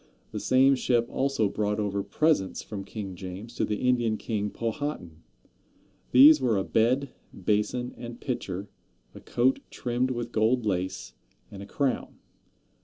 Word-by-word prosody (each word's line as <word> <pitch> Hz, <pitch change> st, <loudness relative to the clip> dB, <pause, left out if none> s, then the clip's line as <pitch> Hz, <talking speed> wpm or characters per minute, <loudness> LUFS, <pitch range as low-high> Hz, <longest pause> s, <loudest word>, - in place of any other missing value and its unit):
The -, -, -4 dB
same 135 Hz, +2 st, +4 dB
ship 120 Hz, -3 st, +1 dB
also 135 Hz, -5 st, +1 dB
brought 105 Hz, +1 st, -1 dB
over 100 Hz, -1 st, -1 dB
presents 100 Hz, +1 st, 0 dB
from 100 Hz, -2 st, -6 dB
King 100 Hz, -2 st, -7 dB
James 95 Hz, +5 st, -8 dB
to -, -, -1 dB
the 105 Hz, -, -1 dB
Indian 120 Hz, -3 st, +2 dB
King 105 Hz, -2 st, -2 dB
Powhatan. 115 Hz, -, -4 dB, 0.9 s
These 145 Hz, +3 st, +8 dB
were 120 Hz, -5 st, +2 dB
a 95 Hz, -, 0 dB
bed, 125 Hz, +7 st, +1 dB, 0.2 s
basin 110 Hz, +4 st, -1 dB
and 120 Hz, 0 st, -8 dB
pitcher, 100 Hz, -6 st, -4 dB, 0.5 s
a -, -, -10 dB
coat 130 Hz, +2 st, +1 dB
trimmed 125 Hz, +1 st, -1 dB
with 120 Hz, -2 st, -3 dB
gold 115 Hz, +2 st, +2 dB
lace, 95 Hz, -2 st, -2 dB, 0.4 s
and 100 Hz, -, -9 dB
a 100 Hz, -, -9 dB
crown. 135 Hz, +4 st, -1 dB
115 Hz, 145 wpm, -27 LUFS, 100-125 Hz, 0.9 s, These